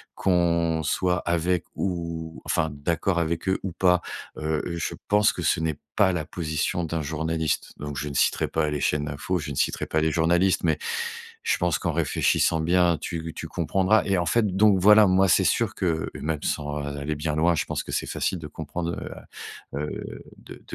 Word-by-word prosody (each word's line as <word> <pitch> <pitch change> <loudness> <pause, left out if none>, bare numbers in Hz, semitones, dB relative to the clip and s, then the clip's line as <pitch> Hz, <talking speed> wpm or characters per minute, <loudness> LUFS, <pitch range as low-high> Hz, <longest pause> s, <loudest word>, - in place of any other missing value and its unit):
qu'on 85 -3 +2
soit 90 +4 +1
avec 85 +1 +1
ou 85 -3 -4
enfin 80 -2 0
d'accord 85 +5 0
avec 85 +1 -2
eux 95 - +2
ou 95 - -3
pas. 90 +1 +3 0.4
Heu, 75 0 -1
heu, 85 - -3
je 85 - -3
pense 105 0 +4
que - - -6
ce - - +1
n'est 80 -3 -1 0.2
pas 95 -2 +4
la 85 -4 -2
position 80 +1 -2
d'un 80 0 -2
journaliste. 80 0 -2
Donc, 75 -1 -6
je 75 +2 -3
ne - - -6
citerai - - +2
pas 80 -2 0
les 75 -1 -2
chaînes 75 0 +1
d'infos, 75 +5 -2
je 75 -2 -5
ne 70 - -5
citerai - - 0
pas 80 - 0
les 80 0 +2
journalistes, 85 +4 +2
mais 80 -2 +2 0.7
je - - +2
pense 85 -3 +1
qu'en - - -1
réfléchissant 80 - +2
bien, 85 0 +3
tu 85 -2 -4
tu - - -5
comprendras 95 +5 +2
et 100 -2 +1
en 85 - 0
fait, 115 +7 +3
donc 105 -1 +5
voilà, 105 +2 +7
moi 95 +1 +4
c'est 95 +1 +4
sûr 110 +3 +1
que 85 -4 -1
même 75 -1 -2
sans 75 -1 -2
aller 70 +1 -3
bien 75 0 -2
loin, 85 +2 +3
je - - -1
pense - - -3
que - - -7
c'est - - -1
facile 95 - -1
de 75 - -7
comprendre, 85 +3 -4 0.8
heu, - - -2
heu, 75 +1 -5 0.2
de - - -13
85 Hz, 200 wpm, -25 LUFS, 75-90 Hz, 0.8 s, voilà